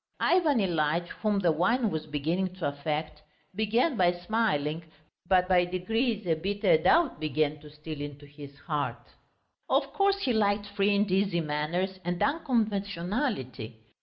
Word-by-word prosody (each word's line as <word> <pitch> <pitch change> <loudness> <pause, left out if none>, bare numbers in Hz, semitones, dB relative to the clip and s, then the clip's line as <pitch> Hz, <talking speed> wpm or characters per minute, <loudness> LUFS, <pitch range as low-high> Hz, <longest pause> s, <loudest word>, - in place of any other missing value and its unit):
Ivan 330 -7 +3
Ilyitch, 170 -3 0
whom 210 -1 +1
the 180 -4 +3
wine 210 +8 +1
was 155 0 -4
beginning 165 +6 -2
to 185 -5 -2
affect, 150 +1 -3 0.3
began 225 - +1
by 175 -1 +4
smiling, 175 -5 -1 0.4
but 180 -1 +3
by 180 -1 +4
degrees 210 +5 -1
a 170 - +2
bitter 195 +4 +2
doubt 310 - +3
began 155 -1 0
to 150 0 -13
steal 150 0 -8
into 145 0 -7
his 145 -1 -12
heart; 150 -3 -3 0.6
of - - +1
course 395 -1 +2
he 255 - +1
liked 205 -1 +1
free 205 0 +1
and 200 -1 +1
easy 190 -2 +2
manners 165 +5 -2
and 175 0 -2
unconventionality. 205 - -1
180 Hz, 145 wpm, -28 LUFS, 155-210 Hz, 0.6 s, by